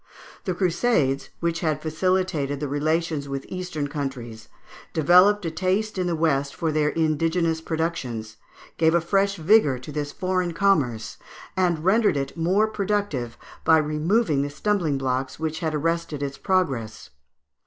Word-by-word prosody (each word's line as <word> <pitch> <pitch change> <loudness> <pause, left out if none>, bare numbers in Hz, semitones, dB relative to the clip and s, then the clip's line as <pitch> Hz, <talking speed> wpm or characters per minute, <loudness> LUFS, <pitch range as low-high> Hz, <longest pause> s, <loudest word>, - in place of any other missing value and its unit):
The 185 -3 -1
Crusades, 170 - +1
which 170 -1 0
had 155 -4 0
facilitated 160 -4 0
the 145 - -2
relations 155 0 -1
with 135 0 -4
Eastern 180 -5 -4
countries, 125 -6 -6 0.4
developed 180 +6 +5
a 165 - -1
taste 190 +6 -1
in 180 - 0
the 170 - 0
West 140 -4 0
for 165 -1 -1
their 150 -1 +2
indigenous 160 +1 0
productions, 140 -10 -3 0.4
gave 160 +1 +3
a - - +5
fresh 195 +4 +1
vigour 165 -5 +4
to 125 +4 -9
this 145 0 -3
foreign 185 -1 -1
commerce, 130 - +1 0.4
and 175 -3 +1
rendered 210 -4 +3
it 135 -1 -3
more 180 +6 +2
productive 200 - -2 0.3
by 160 - +6
removing 155 +2 +1
the 145 - -2
stumbling 170 -2 0
blocks 130 0 -2
which 160 -1 -2
had 160 -3 -2
arrested 165 -1 -1
its 140 -1 -5
progress 135 - -1
(Fig. - - -37
160 Hz, 150 wpm, -24 LUFS, 140-185 Hz, 0.4 s, by